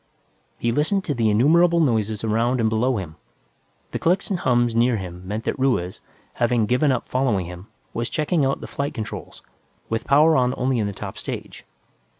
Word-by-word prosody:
He 120 Hz, -, 0 dB
listened 155 Hz, -, +1 dB
to 150 Hz, -, -1 dB
the 115 Hz, -4 st, +1 dB
innumerable 165 Hz, +10 st, +4 dB
noises 110 Hz, -8 st, +1 dB
around 115 Hz, +3 st, +1 dB
and 110 Hz, -1 st, +2 dB
below 120 Hz, +3 st, +1 dB
him. 85 Hz, -5 st, -7 dB, 0.7 s
The -, -, -3 dB
clicks 180 Hz, +4 st, +1 dB
and 185 Hz, -, 0 dB
hums 120 Hz, -4 st, +2 dB
near 120 Hz, 0 st, +3 dB
him 90 Hz, -1 st, -8 dB
meant 105 Hz, +3 st, -3 dB
that -, -, -3 dB
Ruiz, 110 Hz, -9 st, 0 dB, 0.3 s
having 120 Hz, -2 st, +1 dB
given 125 Hz, +6 st, +2 dB
up 125 Hz, -, -2 dB
following 120 Hz, -8 st, 0 dB
him, 90 Hz, +3 st, -9 dB, 0.3 s
was 115 Hz, 0 st, -2 dB
checking 155 Hz, 0 st, 0 dB
out 135 Hz, 0 st, 0 dB
the -, -, -6 dB
flight 140 Hz, 0 st, -4 dB
controls, 110 Hz, -, -7 dB, 0.5 s
with 115 Hz, 0 st, -2 dB
power 155 Hz, +3 st, +5 dB
on 125 Hz, -2 st, +2 dB
only 130 Hz, -1 st, 0 dB
in 105 Hz, -, 0 dB
the -, -, -3 dB
top 95 Hz, -, -7 dB
stage. -, -, -7 dB
120 Hz, 185 wpm, -23 LUFS, 110-140 Hz, 0.7 s, power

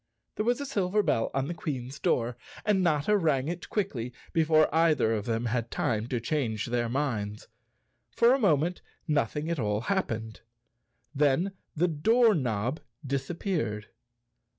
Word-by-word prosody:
There 215 Hz, -, -1 dB
was 245 Hz, +2 st, +2 dB
a 285 Hz, -, -3 dB
silver 205 Hz, -6 st, +1 dB
bell 115 Hz, -, +1 dB
on 135 Hz, 0 st, -1 dB
the 170 Hz, -, -3 dB
Queen's 135 Hz, -5 st, -5 dB
door 120 Hz, 0 st, +1 dB, 0.3 s
and 205 Hz, -3 st, +3 dB
Notta 170 Hz, +3 st, +2 dB
rang 150 Hz, -8 st, +1 dB
it 175 Hz, +1 st, -5 dB
quickly, 135 Hz, -, -2 dB, 0.2 s
before 155 Hz, -1 st, +4 dB
either 160 Hz, -8 st, +3 dB
of 105 Hz, -2 st, -2 dB
them 115 Hz, 0 st, -1 dB
had 120 Hz, 0 st, -1 dB
time 110 Hz, -1 st, -1 dB
to 125 Hz, -1 st, -1 dB
change 115 Hz, -4 st, -1 dB
their 120 Hz, -1 st, -1 dB
minds. 115 Hz, -6 st, -2 dB, 0.6 s
For 235 Hz, +2 st, +4 dB
a 270 Hz, -, +2 dB
moment 175 Hz, -, +2 dB, 0.3 s
nothing 150 Hz, 0 st, 0 dB
at 165 Hz, -, -1 dB
all 105 Hz, -1 st, 0 dB
hap¬ 195 Hz, -1 st, 0 dB
pened. 110 Hz, -1 st, -5 dB, 0.7 s
Then 150 Hz, +6 st, +2 dB, 0.2 s
the 170 Hz, +3 st, +2 dB
door 220 Hz, +9 st, +4 dB
knob 125 Hz, -, -1 dB, 0.3 s
disappeared. 135 Hz, -, -2 dB
145 Hz, 150 wpm, -28 LUFS, 115-175 Hz, 0.7 s, before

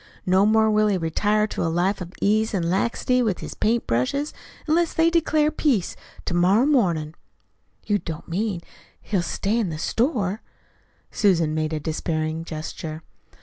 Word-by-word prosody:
No 190 Hz, +2 st, +4 dB
more 220 Hz, 0 st, +4 dB
will 215 Hz, 0 st, +3 dB
he 200 Hz, -2 st, +2 dB
retire 205 Hz, +6 st, +1 dB
to 215 Hz, -, -4 dB
a 165 Hz, -, +1 dB
life 180 Hz, +4 st, 0 dB
of 175 Hz, -1 st, -6 dB
ease 215 Hz, +1 st, +2 dB
an' 180 Hz, -, 0 dB
laxity 235 Hz, +5 st, +1 dB
with 215 Hz, -6 st, 0 dB
his -, -, -7 dB
paint 230 Hz, +2 st, 0 dB
brushes 130 Hz, -, -1 dB, 0.3 s
unless 330 Hz, +1 st, +1 dB
they 330 Hz, +1 st, +4 dB
declarate 310 Hz, -2 st, +2 dB
peace 240 Hz, -, +1 dB, 0.3 s
to -, -, -2 dB
morrow 185 Hz, +8 st, +4 dB
mornin'." 175 Hz, -, +1 dB, 0.7 s
"You 205 Hz, -1 st, +1 dB
don't 160 Hz, -3 st, -7 dB
mean 190 Hz, +1 st, -2 dB, 0.4 s
he'll 195 Hz, -5 st, -1 dB
stay 200 Hz, +6 st, -1 dB
in 210 Hz, -6 st, 0 dB
the 155 Hz, -, -4 dB
store?" 220 Hz, -, 0 dB, 0.7 s
Susan 170 Hz, -7 st, +2 dB
made 155 Hz, 0 st, -1 dB
a 155 Hz, -, -2 dB
despairing 155 Hz, +1 st, -2 dB
gesture. 155 Hz, 0 st, -6 dB
195 Hz, 160 wpm, -23 LUFS, 165-225 Hz, 0.7 s, No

